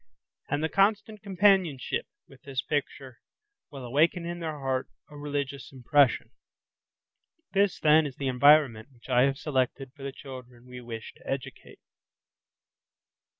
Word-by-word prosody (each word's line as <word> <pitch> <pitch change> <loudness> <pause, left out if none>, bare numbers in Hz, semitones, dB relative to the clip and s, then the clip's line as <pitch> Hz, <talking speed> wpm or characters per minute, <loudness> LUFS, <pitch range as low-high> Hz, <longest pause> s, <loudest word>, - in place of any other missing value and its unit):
And 145 +1 -1
the - - +2
constant 210 +3 +1
companionship 190 - +1 0.2
with 135 - -18
this 135 -2 -4
picture 135 -4 -4 0.5
will 135 -4 -9
awaken 160 +7 +2
in 175 0 -5
their 160 -3 -4
heart 130 -2 -2 0.2
a - - -12
religious 140 -2 -4
impression. 135 +1 +2 1.2
This, 200 -1 +2
then, 155 0 +5
is 135 - -9
the 135 - -4
environment 130 -3 +4
which 125 0 -19
I 125 0 +4
have 135 0 0
selected 135 -2 -2
for 145 - -16
the 135 0 -4
children 125 -3 -11
we 125 0 -10
wish 115 -2 -8
to - - -18
educate. 135 -2 -6
140 Hz, 140 wpm, -27 LUFS, 130-155 Hz, 1.2 s, then